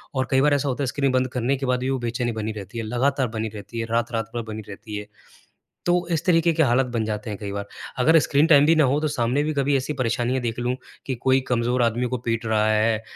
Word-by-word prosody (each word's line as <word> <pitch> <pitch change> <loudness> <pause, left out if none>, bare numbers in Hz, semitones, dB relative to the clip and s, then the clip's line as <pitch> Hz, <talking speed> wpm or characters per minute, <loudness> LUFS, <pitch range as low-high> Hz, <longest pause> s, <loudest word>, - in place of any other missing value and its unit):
और 130 -1 0
कई 135 0 +4
बार 145 +1 +4
ऐसा 140 0 +1
होता 130 +2 -2
है - - -1
स्क्रीन 140 +1 0
बंद 130 0 +2
करने 125 +1 0
के 135 - -3
बाद 125 -1 +1
भी 130 +1 -2
वो 135 -1 0
बेचैनी 120 0 -2
बनी 110 -1 -3
रहती 105 +2 -8
है, 115 - -2
लगातार 130 +4 0
बनी 110 0 -3
रहती 105 +3 -7
है, 115 - -1
रात-रात 115 -1 -1
भर 120 - -1
बनी 110 - -5
रहती 105 +2 -8
है। 105 0 -7 0.8
तो 175 0 +2
इस 165 - 0
तरीके 170 -2 +4
के 160 0 +3
हालत 130 0 +3
बन 115 -2 0
जाते 105 0 -4
हैं 105 - -4
कई 100 -2 -5
बार 100 0 -4 0.3
अगर 160 +6 +5
स्क्रीन 145 +1 +2
टाइम 145 -3 +6
भी 165 +2 +5
ना 155 - +4
हो 135 +3 +2
तो 155 - +1
सामने 130 0 0
भी 155 +1 -1
कभी 140 0 +1
ऐसी 135 +3 -3
परेशानियाँ 120 +2 0
देख 115 -1 -3
लूँ 125 +1 -1 0.3
कि 130 - -2
कोई 130 +2 +2
कमज़ोर 120 0 +1
आदमी 120 +2 +1
को - - -1
पीट 115 0 -1
रहा 110 -1 +2
है, 110 0 +2
125 Hz, 265 wpm, -23 LUFS, 115-140 Hz, 0.8 s, टाइम